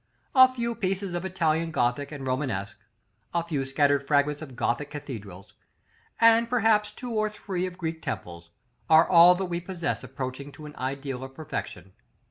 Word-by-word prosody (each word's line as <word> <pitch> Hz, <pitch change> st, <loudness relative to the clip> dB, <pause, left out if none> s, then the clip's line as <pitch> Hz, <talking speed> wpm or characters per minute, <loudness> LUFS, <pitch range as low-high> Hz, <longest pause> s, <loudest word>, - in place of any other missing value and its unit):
A 260 Hz, -1 st, +8 dB
few 235 Hz, -2 st, -2 dB
pieces 195 Hz, -2 st, -2 dB
of 175 Hz, +1 st, -3 dB
Italian 165 Hz, -3 st, 0 dB
Gothic 140 Hz, 0 st, 0 dB
and 140 Hz, -3 st, -7 dB
Romanesque, 130 Hz, -7 st, -2 dB, 0.6 s
a 170 Hz, -, +2 dB
few 150 Hz, -5 st, -2 dB
scattered 140 Hz, +1 st, +2 dB
fragments 145 Hz, 0 st, +2 dB
of 135 Hz, -5 st, -9 dB
Gothic 120 Hz, +5 st, -1 dB
cathedrals, 105 Hz, -11 st, -8 dB, 0.7 s
and 230 Hz, 0 st, +5 dB
perhaps 220 Hz, -3 st, +3 dB
two 240 Hz, +3 st, -8 dB
or 215 Hz, -1 st, +1 dB
three 190 Hz, -3 st, -3 dB
of 180 Hz, -1 st, -9 dB
Greek 160 Hz, -2 st, -4 dB
temples, 85 Hz, -1 st, -6 dB, 0.4 s
are 160 Hz, +1 st, +7 dB
all 175 Hz, 0 st, +8 dB
that 190 Hz, +1 st, -2 dB
we 175 Hz, -1 st, -3 dB
possess 175 Hz, -4 st, -3 dB
approaching 130 Hz, +2 st, -6 dB
to 155 Hz, -, -11 dB
an 150 Hz, 0 st, -10 dB
ideal 135 Hz, 0 st, -4 dB
of 135 Hz, 0 st, -9 dB
perfection. 95 Hz, -, -6 dB
155 Hz, 165 wpm, -27 LUFS, 135-185 Hz, 0.7 s, A